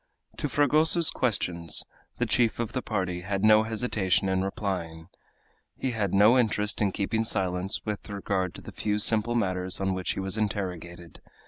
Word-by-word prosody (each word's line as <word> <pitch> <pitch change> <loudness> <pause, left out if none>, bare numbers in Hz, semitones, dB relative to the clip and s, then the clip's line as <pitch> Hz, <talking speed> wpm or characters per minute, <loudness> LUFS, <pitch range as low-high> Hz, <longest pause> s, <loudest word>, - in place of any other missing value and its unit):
To 145 - -2
Fragoso's 155 +4 +4
questions 90 -8 0 0.3
the - - 0
chief 115 -2 +1
of 115 -1 -3
the 130 - -1
party 95 -6 -2
had 95 +2 -3
no 110 0 +7
hesitation 110 -4 0
in 95 0 +1
replying; 90 -4 -4 0.7
he 130 - -2
had 105 -5 -1
no 105 +6 +5
interest 105 -3 0
in 100 -2 +2
keeping 110 +4 -1
silence 95 -2 -2
with 105 0 -5
regard 95 -2 -2
to - - -9
the - - -10
few 105 -1 -1
simple 110 +2 +2
matters 95 -4 -1
on 95 -1 0
which 95 -1 -2
he - - -5
was 95 +2 -2
interrogated. 90 -5 -4
100 Hz, 165 wpm, -27 LUFS, 95-110 Hz, 0.7 s, no